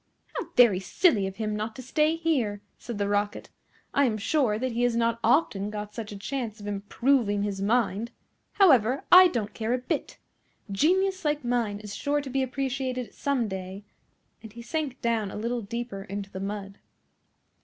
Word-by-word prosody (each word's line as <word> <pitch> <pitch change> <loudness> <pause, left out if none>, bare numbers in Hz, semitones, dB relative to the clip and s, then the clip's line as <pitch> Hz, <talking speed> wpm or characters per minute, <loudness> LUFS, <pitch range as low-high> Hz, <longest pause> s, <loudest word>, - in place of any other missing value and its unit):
"How - - -3
very 235 -7 +6
silly 205 - +2
of 190 - -7
him 215 -1 -2
not 215 +1 -4
to 255 - -8
stay 305 +5 +2
here!" 255 -12 -1 0.2
said 235 -3 -6
the 200 0 0
Rocket. 205 0 -1 0.4
"I 280 - +4
am 220 -4 0
sure 220 -1 +1
that 255 +3 -2
he 235 +1 -2
has 245 -1 +2
not 230 0 +1
often 205 -10 +2
got 210 0 -6
such 215 -1 -6
a 205 - -7
chance 230 0 -4
of 205 - -9
improving 205 +1 +1
his 200 -2 -3
mind. 220 0 +1 0.4
However, 270 - +4
I 365 +1 +10
don't 225 - -3
care 225 +1 -1
a - - 0
bit. 255 0 -3 0.5
Genius 375 - +2
like 295 -3 0
mine 235 -4 0
is 210 -1 -8
sure 290 0 0
to 280 -2 -6
be 270 +1 +1
appreciated 260 -3 -3
some 270 -5 0
day;" 190 0 -6 0.6
and 220 - -11
he 235 0 -9
sank 295 -1 -3
down 225 -3 0
a - - -8
little 235 +3 -2
deeper 230 -1 -5
into 200 +1 -6
the 190 - -6
mud. 195 0 -5
230 Hz, 185 wpm, -27 LUFS, 205-265 Hz, 0.6 s, I